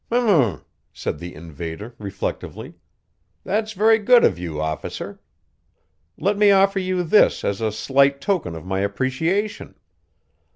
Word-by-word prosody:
"H'm," 185 - +2 0.3
said 75 - -5
the 85 +1 -8
invader, 85 - -8
reflectively. 100 -2 -5 0.7
"That's 215 +2 -1
very 220 +3 +4
good 240 +3 +5
of - - +3
you, 80 -4 -5
Officer. 80 0 -5 1.0
Let 200 +2 0
me 210 -1 +6
offer 195 0 +4
you 185 -1 -1
this 175 +5 +3
as 100 +2 -2
a 110 -1 0
slight 140 +5 +2
token 170 - -1
of 80 - -9
my 95 +1 -2
appreciation." 135 - -2
140 Hz, 130 wpm, -22 LUFS, -, 1.0 s, me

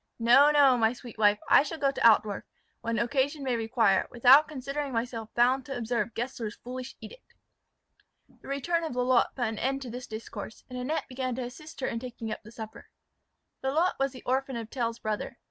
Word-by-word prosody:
No, 245 +5 +6
no, 280 -4 +5
my 225 +1 +3
sweet 240 -2 -12
wife; 205 -1 +5
I - - +7
shall 300 +3 -4
go 275 -3 +2
to - - -7
Altdorf, 215 -3 +4 0.4
when 230 0 -2
occasion 275 +4 0
may 255 -2 0
require, 225 -4 +2
without 260 +5 +6
considering 280 0 -4
myself 230 -1 -3
bound 255 +3 +3
to 270 -2 -4
observe 230 -2 -2
Gessler's 235 -3 -4
foolish 255 +1 -8
edict." - - -13 0.9
The - - -18
return 330 +5 -1
of 320 - -3
Lalotte 250 0 +2
put 245 - -1
an 220 -1 -3
end 270 +1 -1
to 245 - -7
this 245 +1 -7
discourse; 220 -1 -8
and 250 - -5
Annette 280 +6 -2
began 255 -1 -3
to 255 - -3
assist 280 +4 -10
her 260 - 0
in 230 - -2
taking 235 -2 -6
up - - -5
the 215 - -14
supper. 220 -2 -9 0.7
Lalotte 315 +7 +1
was 275 0 +1
the 255 - -12
orphan 265 +1 0
of 230 -1 -6
Tell's 235 -3 -2
brother. 215 -2 -4
250 Hz, 195 wpm, -28 LUFS, 230-270 Hz, 0.9 s, I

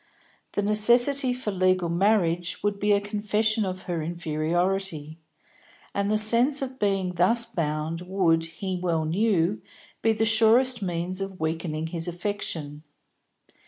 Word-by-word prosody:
The 205 - -1
necessity 240 +6 +4
for 245 -4 -3
legal 185 -2 +1
marriage 175 -1 +1
would 205 -1 -1
be 205 +1 +1
a 200 - +4
confession 210 +1 0
of 185 0 -5
her 170 -2 -3
inferiority, 165 0 -2 0.7
and 200 0 -1
the 215 - +2
sense 240 +6 +3
of 260 0 -7
being 195 -3 0
thus 230 +7 +3
bound 165 -6 -3
would, 170 -4 +2
he 180 +3 -5
well 165 -3 0
knew, 190 +1 +1 0.4
be 225 - +3
the 220 +1 0
surest 230 +2 +3
means 180 0 -3
of 195 -1 -6
weakening 160 0 -3
his 165 +1 -4
affection. 175 -5 -5
190 Hz, 135 wpm, -25 LUFS, 165-215 Hz, 0.7 s, necessity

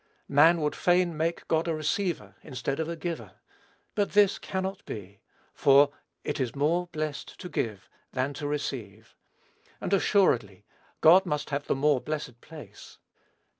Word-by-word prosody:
Man 160 +4 +6
would 150 -1 0
fain 175 -1 +2
make 165 +2 -2
God 160 +1 +1
a 165 - 0
receiver 155 - -2
instead 135 0 -4
of 160 0 -1
a 170 - -3
giver; 170 0 -5 0.6
but 205 -1 0
this 205 -1 +4
cannot 190 +1 -4
be; 100 -1 -8 0.3
for, 140 +1 +5 0.3
"it 150 - -3
is 130 -1 -2
more 165 +5 +1
blessed 155 -3 -5
to 180 - -6
give 110 - -3 0.2
than 135 +2 -1
to 145 0 -4
receive;" 115 -8 -5 0.6
and, 195 - -2
assuredly, 125 - +2 0.4
God 180 +4 +7
must 150 0 -2
have 140 +1 -2
the - - +1
more 140 -1 +2
blessed 150 -6 -5
place. 145 -11 -12
150 Hz, 150 wpm, -28 LUFS, 135-170 Hz, 0.6 s, God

